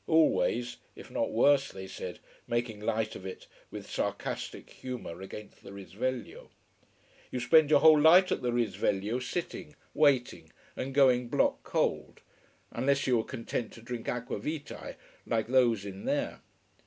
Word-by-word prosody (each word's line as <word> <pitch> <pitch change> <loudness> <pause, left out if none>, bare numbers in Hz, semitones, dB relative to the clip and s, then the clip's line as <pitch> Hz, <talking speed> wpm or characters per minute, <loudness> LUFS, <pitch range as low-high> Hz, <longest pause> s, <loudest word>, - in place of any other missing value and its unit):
Always 120 - +2 0.2
if - - -12
not - - 0
worse, 135 +3 +4
they 95 0 -8
said, 95 - -7 0.3
making 120 -2 -2
light 110 +1 -1
of - - -9
it, 95 -1 -8 0.2
with - - -8
sarcastic - - -4
humor 125 -9 -7
against 105 +2 -10
the - - -11
Risveglio. 110 +5 -5 0.8
You 125 - -3
spent 145 +5 +5
your 145 -2 +5
whole 155 -2 +7
life 180 +4 +7
at - - 0
the 125 -1 0
Risveglio 110 -1 0
sitting, 150 +3 -5 0.2
waiting, 140 -5 +2 0.2
and 135 +1 -5
going 125 -3 +4
block - - +1
cold: - - -1 0.5
unless 140 +1 +1
you 130 - +3
were 110 - 0
content 120 -2 -4
to 115 - -12
drink 120 -1 -5
aqua 120 0 -3
vitae, 150 -1 -6 0.3
like 115 -2 0
those 120 -5 +3
in 100 -1 -8
there. - - -1
125 Hz, 150 wpm, -30 LUFS, 110-140 Hz, 0.8 s, whole